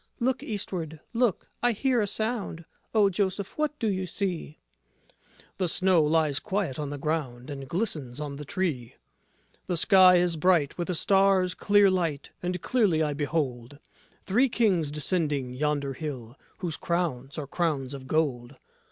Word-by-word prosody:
Look 260 +2 0
Eastward, 180 - -4
look! 235 -5 +1
I 245 -1 +3
hear 250 +2 +1
a 205 - 0
sound. 210 -6 -2 0.3
O 215 -3 +4
Joseph, 195 0 -1
what 305 -1 -1
do 225 - -1
you 190 -2 -1
see? 175 -5 -3
JOSEPH - - -32
The 185 - +1
snow 185 0 +3
lies 150 -2 +2
quiet 180 -4 -2
on 145 -2 -3
the 145 - -5
ground 140 -4 -3
And 135 -1 -7
glistens 150 - -2
on 145 -2 -5
the 150 - -6
tree; 145 -7 -2 0.7
The 175 - 0
sky 185 0 +7
is 175 -2 +2
bright 165 -3 +2
with 175 0 -4
a 180 - 0
star's 190 0 +3
great 205 0 +4
light, 165 -6 -2
And 180 0 -3
clearly 200 -11 +2
I 150 -1 -1
behold 140 -3 -2 0.5
Three 245 +7 +2
Kings 190 -10 +2
descending 145 -4 -1
yonder 145 0 -1
hill, 130 -5 -6 0.2
Whose 170 -3 -3
crowns 160 -7 -2
are 150 - -3
crowns 145 -3 -1
of 135 -1 -8
gold. 135 -4 -1
165 Hz, 160 wpm, -27 LUFS, 145-195 Hz, 0.7 s, sky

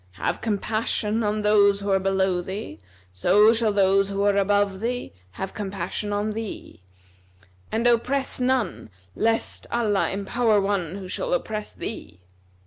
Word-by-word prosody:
Have 90 - -2
compassion 215 0 -1
on 210 0 -1
those 200 -1 +4
who 200 0 -2
are 190 - +4
below 190 -1 +1
thee, 185 - -6 0.3
so 205 - +5
shall 225 -2 +2
those 195 0 +3
who 200 0 -1
are 205 0 +3
above 200 -1 +2
thee 245 +3 -3 0.2
have 190 0 -5
compassion 200 0 -4
on 205 +1 -1
thee; 220 - -7 0.9
and 225 +2 -1
oppress 250 +4 +1
none, 250 - 0 0.3
lest 225 +1 -1
Allah 215 -4 +1
empower 210 +2 +1
one 195 -4 -1
who 195 -2 -7
shall - - -1
oppress 215 - -4
thee. - - -7
205 Hz, 140 wpm, -24 LUFS, 195-225 Hz, 0.9 s, so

